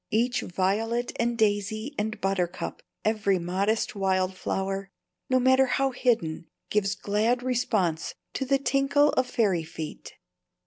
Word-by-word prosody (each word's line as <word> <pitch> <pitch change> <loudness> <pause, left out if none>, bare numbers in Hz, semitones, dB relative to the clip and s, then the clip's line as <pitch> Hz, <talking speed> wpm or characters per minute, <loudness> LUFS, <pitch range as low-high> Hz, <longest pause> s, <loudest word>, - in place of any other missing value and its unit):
Each 245 +3 +1
violet 220 +7 0
and 235 0 +1
daisy 215 +4 0
and 220 -2 -2
buttercup, 185 -2 -2 0.2
every 210 -3 +2
modest 190 +5 0
wild 190 -1 +1
flower 195 +1 -2 0.4
(no 255 0 +4
matter 260 +1 +5
how 270 +1 +1
hidden) 220 -11 0 0.2
gives 205 -1 +1
glad 215 +5 0
response 215 -10 0 0.2
to - - -2
the 275 +1 +2
tinkle 275 +2 +3
of 255 -3 +1
fairy 195 -9 +1
feet. 160 -1 -7
215 Hz, 130 wpm, -27 LUFS, 190-245 Hz, 0.4 s, matter